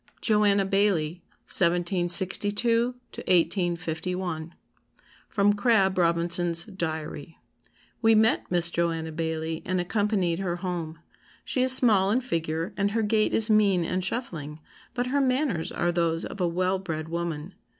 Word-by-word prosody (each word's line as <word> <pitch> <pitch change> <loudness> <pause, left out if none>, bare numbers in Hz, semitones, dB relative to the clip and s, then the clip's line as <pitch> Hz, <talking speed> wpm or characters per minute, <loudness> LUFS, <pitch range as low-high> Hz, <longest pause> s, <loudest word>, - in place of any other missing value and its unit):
JOANNA 205 -2 +2
BAILLIE 190 -4 0 0.2
1762 190 +7 +3 0.2
1851 175 -1 -2 0.7
[Sidenote: 205 -1 +2
Crabb 200 -3 +2
Robinson's 170 0 +3
Diary.] 160 -6 -6 0.6
"We 225 -1 +4
met 220 +1 +2
Miss 175 -1 +1
Joanna 165 -2 -2
Baillie, 160 0 -4
and 185 0 -2
accompanied 190 -2 -1
her 180 -3 -2
home. 175 -3 -5 0.5
She 255 - -2
is 260 0 +5
small 215 -7 +4
in 240 +5 +1
figure, 165 -7 -3
and 200 0 0
her 225 +2 -1
gait 215 0 +1
is 220 0 +1
mean 200 -5 +3
and 185 +2 -2
shuffling, 165 - -5 0.4
but 245 -1 -1
her 280 +3 0
manners 255 - -1
are 175 - -1
those 170 -1 -1
of 200 - -8
a 175 - +1
well 185 +2 -1
bred 160 -4 -5
woman. 170 0 -5
180 Hz, 130 wpm, -25 LUFS, 170-205 Hz, 0.7 s, is